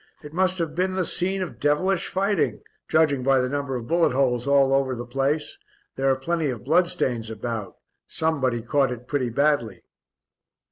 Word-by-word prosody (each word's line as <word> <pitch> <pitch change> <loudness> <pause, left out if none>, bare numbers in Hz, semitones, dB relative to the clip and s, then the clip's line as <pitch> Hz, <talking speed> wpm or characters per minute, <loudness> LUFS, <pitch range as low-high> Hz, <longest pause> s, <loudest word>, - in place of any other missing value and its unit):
It 150 0 -10
must 185 +1 +2
have 165 -3 -2
been 185 +2 -1
the 185 -2 0
scene 190 +3 +1
of 180 - -8
devilish 170 +6 +1
fighting 195 -2 0 0.2
judging 155 -4 +2
by 135 +1 +3
the 125 - 0
number 140 0 -3
of 120 -2 -5
bullet 170 0 +2
holes 125 -2 +1
all 140 -1 +4
over 135 -1 +1
the 120 0 -6
place. 140 - -1 0.4
There 135 0 +1
are 135 - +3
plenty 160 +3 -1
of 120 -3 -5
bloodstains 145 -7 +1
about, 110 -1 -5 0.3
somebody 135 -7 -1
caught 135 +2 +1
it 125 0 -7
pretty 130 -3 -1
badly." 120 -6 0
140 Hz, 175 wpm, -24 LUFS, 125-165 Hz, 0.4 s, all